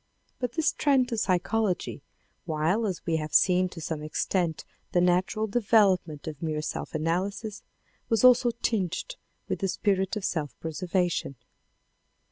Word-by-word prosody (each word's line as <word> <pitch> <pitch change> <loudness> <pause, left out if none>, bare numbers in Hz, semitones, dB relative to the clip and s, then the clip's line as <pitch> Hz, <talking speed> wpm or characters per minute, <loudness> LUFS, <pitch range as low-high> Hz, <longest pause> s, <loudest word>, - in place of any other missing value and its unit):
But 250 -1 -2
this 320 -1 +2
trend 270 -4 +2
to 230 - -2
psychology, 185 -2 0 0.4
while 165 +7 +1
as 185 -4 -4
we 165 -1 +1
have 155 -1 -4
seen, 185 0 +4
to 175 - -10
some 160 -1 -4
extent, 160 +2 -1 0.3
the 175 - +4
natural 180 +4 +2
development 200 -8 +2
of 150 -3 -6
mere 155 -2 -2
self - - -5
analysis 190 +7 -2 0.5
was 225 -2 +2
also 250 -1 +7
tinged 205 - -1 0.3
with - - -2
the 195 - 0
spirit 190 0 0
of 210 -3 -3
self 150 -4 -3
preservation. 175 -2 -1
185 Hz, 140 wpm, -27 LUFS, 165-215 Hz, 0.5 s, also